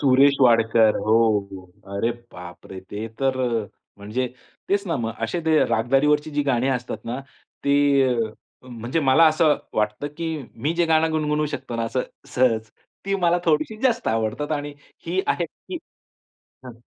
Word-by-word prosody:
सुरेश 140 0 +5
वाडकर, 115 -3 +5
हो, - - -4
हो, 110 -1 +4 0.2
हो. 95 +1 -11
अरे 115 +4 +1 0.2
बाप 90 -1 -11
रे! 95 - -7
ते 105 +2 -4 0.2
तर 130 -1 +1 0.3
अ, - - -12 0.3
म्हणजे 110 +6 -2 0.4
तेच 200 0 +1
ना 165 - +1
मग 115 - -2
असे 140 +10 -3
ते 155 - +4 0.2
रागदारीवरची 145 +6 +2
जी 145 - +3
गाणी 125 0 +2
असतात 125 0 -5
ना 125 - -3 0.5
ते 140 0 +3 0.4
अ, 115 -2 -1 0.4
म्हणजे 120 +6 -3
मला 140 +3 +5
असं 155 -2 +3 0.2
वाटतं, 105 +6 -1
की 165 0 -3 0.4
मी 165 - +1
जे 170 - +5
गाणं 160 0 +3
गुणगुणवू 150 -1 0
शकतो 120 -3 -7
ना 115 - -1
असं 130 - 0 0.3
सहज 115 -4 +2 0.3
ती 195 0 0
मला 170 +1 +3
थोडीशी 155 +6 +1
जास्त 245 -3 +1
आवडतात 115 +7 -1
आणि 145 0 -7 0.3
ही 180 +3 +1
आहे 175 - +1
की, 355 - -9 0.9
हां. 125 - -8
130 Hz, 165 wpm, -23 LUFS, 115-155 Hz, 0.9 s, सुरेश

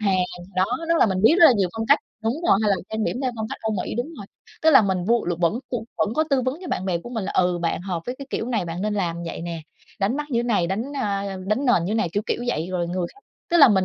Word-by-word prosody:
Hàn, 200 -3 +2 0.4
đó, 185 - +4 0.2
nó 335 - +4
là 240 - +5
mình 190 -2 0
biết 265 +9 +7
rất 330 - +11
là - - +7
nhiều 190 - +2
phong 225 - -1
cách, 285 - +6 0.2
đúng 225 +3 0
rồi, 195 - +6
hay 210 - +2
là 195 - +3
trang 220 0 -1
điểm - - -1
theo 255 - +1
phong 220 0 -3
cách - - -6
Âu 220 0 0
Mỹ, - - -4
đúng 245 - -1
rồi. 200 - -8 0.4
Tức 320 - +6
là 270 - +8
mình 190 -3 0
vu 235 +3 +2
là 175 - 0
vẫn 175 +7 +2
cu 235 -3 -2
vẫn 215 +1 +1
có 315 - +2
tư 265 -2 +3
vấn 260 +5 -2
cho 355 - -6
bạn 185 - -2
bè 175 -2 0
của 240 - -10
mình 225 -5 -3
là, - - -3
ừ, 180 -1 +2
bạn 170 0 -1
hợp 180 -3 -3
với 245 - -3
cái 275 - -7
kiểu 225 - -2
này 220 -7 0
bạn 170 +2 -4
nên 210 0 0
làm 175 -4 -1
vậy - - -5
nè, 170 -1 -4 0.4
đánh 205 +7 +1
mắt 295 0 -4
như 235 - +1
thế - - -2
này, 205 -8 +2
đánh, 195 +5 -1 0.2
a, 200 -4 -2
đánh 215 +7 0
nền 175 -9 +4
như 190 - -2
thế - - 0
này, 215 -6 +1
kiểu, 205 - 0
kiểu 240 - -1
vậy, 165 -7 -1
rồi 175 -2 -1
người 180 -1 -1
khác 405 - -20 0.3
tức 345 - +4
là 280 - +9
mình 190 -4 +3
210 Hz, 320 wpm, -23 LUFS, 185-240 Hz, 0.4 s, rất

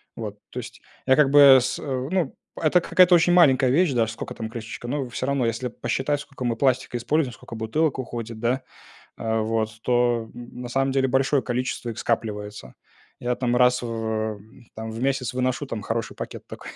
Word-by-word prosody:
Вот, 105 -3 -6
то - - -5
есть. - - -9 0.2
Я, 130 - +5
как 145 -3 +4
бы, 140 -2 +9
с 125 - -2
ну. 140 +4 -2 0.3
Это 165 +2 +3
какая-то 180 +1 +5
очень 175 +1 +5
маленькая 135 -7 +5
вещь, 165 +5 +3
даже 115 -3 +1
скока - - -7
там 110 -1 -6
крышечка, 115 0 -7
но 135 +1 -2
всё 130 +1 -4
равно, 140 -3 +1
если 115 +2 -1
посчитать, 135 +4 -2
сколько 140 -3 -9
мы 120 -2 0
пластика 130 0 +1
используем, 140 +3 0
сколько 115 - -12
бутылок 135 +7 0
уходит, 115 -3 -6
да, 120 +3 0 0.5
а 110 -1 -1
вот, 110 0 -2
то, 120 -2 +1
н 120 0 -9
на 120 - -6
самом 135 +2 +1
деле 135 0 +2
большое 135 +2 +2
количество 125 -1 -3
их 115 - -6
скапливается. 105 - -3 0.4
Я 125 0 -1
там 125 -1 0
раз 125 0 +4
в, 120 - -4
э, 110 -1 -2 0.4
там, 110 0 -6
в 115 +1 -6
месяц 135 -2 0
выношу 130 +2 -1
там 115 -5 -5
хороший 115 +2 -3
пакет - - -7
тока - - -10
125 Hz, 195 wpm, -24 LUFS, 115-135 Hz, 0.5 s, бы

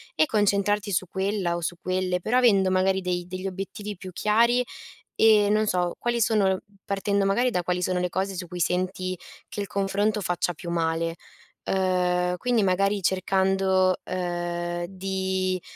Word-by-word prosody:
e - - +4
concentrarti 205 -3 +1
su 185 0 +1
quella 190 -1 -1
o 170 - -4
su 175 +2 -3
quelle, 185 0 -1
però 220 +8 0
avendo 200 -6 +4
magari 190 +1 +2
dei 180 -1 -2
degli 185 +2 -5
obiettivi 195 +2 -6
più 185 0 -9
chiari 235 +6 +2 0.5
e, 215 -2 +5
non 215 +1 +2
so, 180 -3 0
quali 240 0 0
sono 205 -4 +2 0.2
partendo 200 0 0
magari 240 +6 +2
da 180 -5 0
quali 180 +1 -1
sono 180 0 0
le 180 - -1
cose 190 +3 -2
su 180 0 -5
cui 180 +1 -7
senti 185 +1 -1 0.3
che 205 - -5
il 200 - -4
confronto 200 +2 0
faccia 180 -1 0
più 170 +2 -8
male. 165 0 0 0.5
Uhm 180 -1 +1
quindi 245 -1 +1
magari 195 +2 +1
cercando, 190 0 +2
uhm 175 -1 -3
di 190 -1 -2
190 Hz, 160 wpm, -25 LUFS, 180-200 Hz, 0.5 s, e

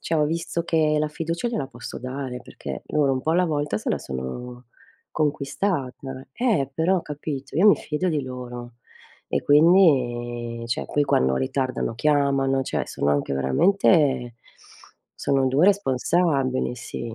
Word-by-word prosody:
cioè 160 - -1
ho 150 - +3
visto 165 +2 -2
che 155 -2 +2
la 150 - 0
fiducia 165 +7 -3
gliela 145 - -2
posso 120 -1 -8
dare, 130 -1 -5
perché - - -8
loro 145 -3 +1
un 130 - -1
po' 160 - 0
alla 180 +2 +3
volta 150 -6 -1
se 105 - -3
la - - 0
sono 120 - -6 0.5
conquistata. 140 -3 -2
Eh 205 - 0
però 175 +2 +1
capito, 145 -2 -6
io 190 +6 +5
mi 205 - +6
fido 155 +5 -2
di 150 -4 0
loro 125 -2 -8 0.5
e - - -1
quindi 120 -8 +3
cioè 120 - -2
qui 145 - +1
quando 65 - +2
ritardano 130 - -1
chiamano, 135 0 +2
cioè - - -2
sono 70 - -1
anche 70 -1 0
veramente 135 - +2 0.8
sono 135 -1 +1
2 145 +8 +3
responsabili, 140 -7 +1
sì. 115 -1 -6
140 Hz, 145 wpm, -24 LUFS, 125-160 Hz, 0.8 s, mi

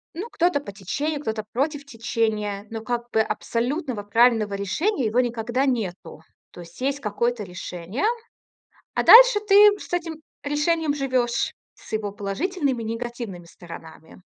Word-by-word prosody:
Ну 385 +8 -5
кто-то 355 -7 +1
по 200 -8 -9
течению, 285 - -3
кто-то 220 -5 -3
против 285 +3 -1
течения, 220 -4 -2
но 225 -1 -5
как 240 +1 -3
бы 220 - +3
абсолютного 235 +2 -2
правильного 220 -1 +3
решения- 260 - -1
его 225 +3 +2
никогда 240 +2 -1
нету. 190 - -3 0.3
То - - -13
есть 170 +7 -14
есть 275 +2 0
какое-то 235 0 -1
решение, 180 - -6 0.9
а - - 0
дальше - - +9
ты 395 - +5 0.2
с - - -11
этим 335 -2 -2 0.3
решением 300 +1 0
живешь, 255 -4 0 0.2
с - - -16
его 215 -2 -1
положительными 260 - -2
и 220 - -5
негативными 230 -5 -5
сторонами. 165 -1 -12
235 Hz, 140 wpm, -24 LUFS, 205-285 Hz, 0.9 s, дальше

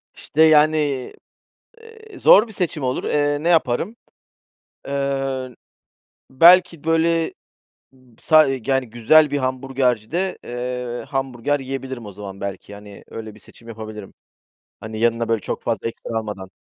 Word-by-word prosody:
İşte, 155 - -2
yani, 155 0 +5 1.1
eee, 445 -4 -14
zor 215 - +6
bir 220 - -11
seçim 175 -6 -2
olur. 125 0 -2
Eee, 145 0 +1
ne 170 - 0
yaparım? 165 - +1 0.9
Eee, 135 -2 -2 0.8
belki, 170 +3 +5
böyle, 165 0 +1 0.8
sa 155 -1 +5 0.2
yani, 135 -3 0
güzel 135 +7 +4
bir 145 - 0
hamburgercide, 130 - -1
eee, 125 0 -5
hamburger 135 +1 -2
yiyebilirim 130 -3 -6
o 100 - -9
zaman. 100 -1 -9
Belki, 100 +1 -6
hani, 100 0 -13
öyle 110 -2 -8
bir 110 - -17
seçim 115 - -16
yapabilirim. 110 -2 -9 0.7
Hani, 110 0 -7
yanına, 115 0 +1
böyle, 115 -1 +1
çok - - -5
fazla 115 -1 -2
ekstra 115 0 -7
almadan. 105 -4 -7
130 Hz, 130 wpm, -21 LUFS, 115-155 Hz, 1.1 s, zor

